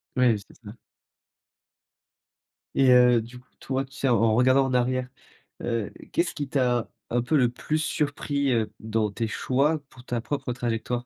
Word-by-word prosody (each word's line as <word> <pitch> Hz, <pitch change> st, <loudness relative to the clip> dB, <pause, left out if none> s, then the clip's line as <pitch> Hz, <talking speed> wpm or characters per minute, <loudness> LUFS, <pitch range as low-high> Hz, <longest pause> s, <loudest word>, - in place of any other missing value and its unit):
Ouais, 125 Hz, -3 st, +4 dB
c'est 100 Hz, -, -15 dB
ça. 105 Hz, -1 st, -9 dB, 2.0 s
Et 135 Hz, -2 st, +5 dB
heu, 125 Hz, -2 st, +6 dB
du 120 Hz, +2 st, -11 dB
coup 125 Hz, -, -24 dB
toi, 135 Hz, 0 st, -2 dB
tu 135 Hz, -, -25 dB
sais, 135 Hz, -, -1 dB
en 120 Hz, -, +4 dB
en 115 Hz, -1 st, +4 dB
regardant 130 Hz, +3 st, +4 dB
en 130 Hz, -, -2 dB
arrière, 125 Hz, +1 st, +1 dB, 0.5 s
heu, 115 Hz, -4 st, -2 dB, 0.2 s
qu'est-ce 170 Hz, +1 st, 0 dB
qui 145 Hz, -3 st, -3 dB
t'a, 125 Hz, -4 st, +1 dB, 0.2 s
un 120 Hz, +1 st, +1 dB
peu, 145 Hz, +5 st, +1 dB
le 125 Hz, -, +4 dB
plus 150 Hz, +5 st, -2 dB
surpris, 145 Hz, -2 st, -1 dB
heu, 110 Hz, -3 st, 0 dB
dans 110 Hz, -1 st, 0 dB
tes 115 Hz, +3 st, -2 dB
choix 140 Hz, +7 st, +1 dB
pour 125 Hz, -2 st, -15 dB
ta 120 Hz, -2 st, -2 dB
propre 140 Hz, 0 st, -3 dB
trajectoire? 120 Hz, -1 st, -3 dB
125 Hz, 175 wpm, -26 LUFS, 115-135 Hz, 2.0 s, heu